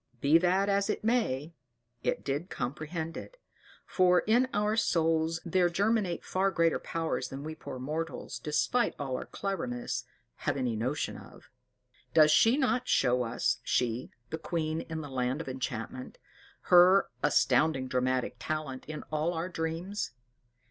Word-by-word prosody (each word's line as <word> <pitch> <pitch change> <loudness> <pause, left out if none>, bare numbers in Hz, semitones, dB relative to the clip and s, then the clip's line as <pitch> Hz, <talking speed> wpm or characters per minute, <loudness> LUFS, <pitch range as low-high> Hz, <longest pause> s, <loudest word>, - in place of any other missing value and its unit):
Be 150 +6 +5
that 185 +3 +2
as 200 0 +1
it - - -2
may, 170 - 0 0.5
it - - -1
did 145 +6 -2
comprehend 155 +6 -4
it; - - -9 0.5
for 180 -1 +4
in 240 +4 +3
our 210 +1 +1
souls 165 -5 +1
there 175 +1 +3
germinate 200 0 0
far 190 +1 +1
greater 165 -3 +2
powers 165 -6 -2
than 135 +1 -7
we 155 +1 -5
poor 155 -4 -8
mortals, 155 +5 -4
despite 155 +11 +1
all 135 -3 -3
our - - -5
cleverness, 165 -12 -3 0.3
have - - -1
any 125 -4 -1
notion 125 +7 -2
of. - - -15 0.6
Does 155 -1 +7
she 225 - +5
not 255 -3 +1
show 125 -1 +3
us 115 -2 0
she 120 0 0 0.2
the 160 - -3
queen 160 -1 -2
in 160 -1 -3
the 150 - -7
land 130 +1 -1
of 165 - -6
enchantment 130 -1 -5 0.6
her 180 +2 +7
astounding 145 -2 +3
dramatic 130 -1 0
talent 150 0 -4
in 155 0 -6
all 155 +3 0
our 165 +3 -2
dreams? 165 - -3
160 Hz, 150 wpm, -30 LUFS, 135-185 Hz, 0.6 s, Does